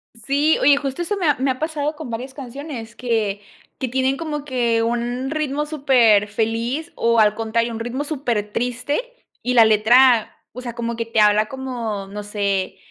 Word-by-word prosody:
Sí, 280 +7 +1
oye, 285 +1 +6
justo 280 +3 -3
eso 410 +4 -2
me 360 -4 0
ha 295 - +4
me 265 +1 0
ha 255 - -5
pasado 310 -1 -2
con 300 -4 -8
varias 245 +4 -5
canciones 260 -3 -8
que 220 -5 -1 0.4
que 260 - -2
tienen 265 +2 0
como 300 -2 -4
que 240 -5 0
un 240 +3 -2
ritmo 300 -1 -1
superfeliz, 235 0 +1
o, 230 0 +2
al 210 -1 +4
contrario, 230 +2 -1
un 225 - -5
ritmo 240 +5 -3
supertriste 245 -2 -2 0.4
y 250 - -1
la 235 -2 +7
letra, 225 +2 +5 0.2
o 250 - -9
sea, 245 -2 -6
como 235 0 -4
que 230 - -2
te 225 -1 +1
habla 210 +1 +4
como, 235 -7 -5
no 205 +1 -7
sé, 200 -2 -2
245 Hz, 175 wpm, -21 LUFS, 225-275 Hz, 0.4 s, la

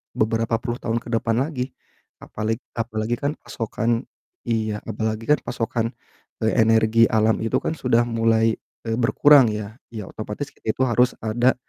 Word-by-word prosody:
beberapa 115 +1 +1
puluh 120 0 -3
tahun 115 0 -1
ke - - -10
depan 115 0 +1
lagi. 130 -4 -4 0.5
Apaleg 110 +2 -3 0.2
apalagi 115 0 -1
kan 145 +1 0
pasokan 115 +1 -2 0.4
iya, 110 -2 0
apalagi 110 0 -2
kan 150 - +5
pasokan, 115 -1 -2 0.5
eee, 110 - +2
energi 115 0 +4
alam 110 0 +3
itu 115 - +1
kan - - -1
sudah 120 -2 +3
mulai, 115 -1 +2 0.3
eee, 115 - 0
berkurang 135 +1 +6
ya, 105 +1 -5 0.2
ya 105 -4 -6
otomatis 110 +7 -6
itu 110 +4 -3
harus 125 +1 +3
ada 120 +4 +2
115 Hz, 150 wpm, -23 LUFS, 110-120 Hz, 0.5 s, berkurang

